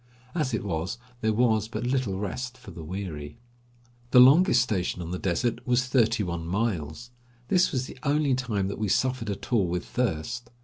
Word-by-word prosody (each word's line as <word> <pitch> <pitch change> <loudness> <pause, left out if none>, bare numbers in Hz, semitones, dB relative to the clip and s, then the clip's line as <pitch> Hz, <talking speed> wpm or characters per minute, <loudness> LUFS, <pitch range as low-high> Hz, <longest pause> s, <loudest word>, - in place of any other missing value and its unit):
As 150 -6 -1
it 110 - -2
was 90 +4 -2 0.2
there 110 -1 +1
was 110 -1 +2
but 120 - -5
little 125 -6 0
rest 125 +6 -4
for 125 - -12
the 85 - -9
weary. 80 -4 -6 0.7
The 125 - +6
longest 135 0 +7
station 95 -7 -2
on 85 -1 -5
the 90 - -3
desert 105 +9 -1
was 125 0 +2
thirty 120 -3 +2
one 85 -2 -3
miles. 100 +1 -2 0.4
This 180 -1 +3
was 130 -1 -1
the 130 - -11
only 145 -1 +2
time 115 -7 -1
that 100 - -5
we 110 - 0
suffered 125 +2 0
at 100 +5 -5
all 100 -6 +3
with 90 +1 -2
thirst. 120 +2 -2
115 Hz, 185 wpm, -27 LUFS, 95-125 Hz, 0.7 s, longest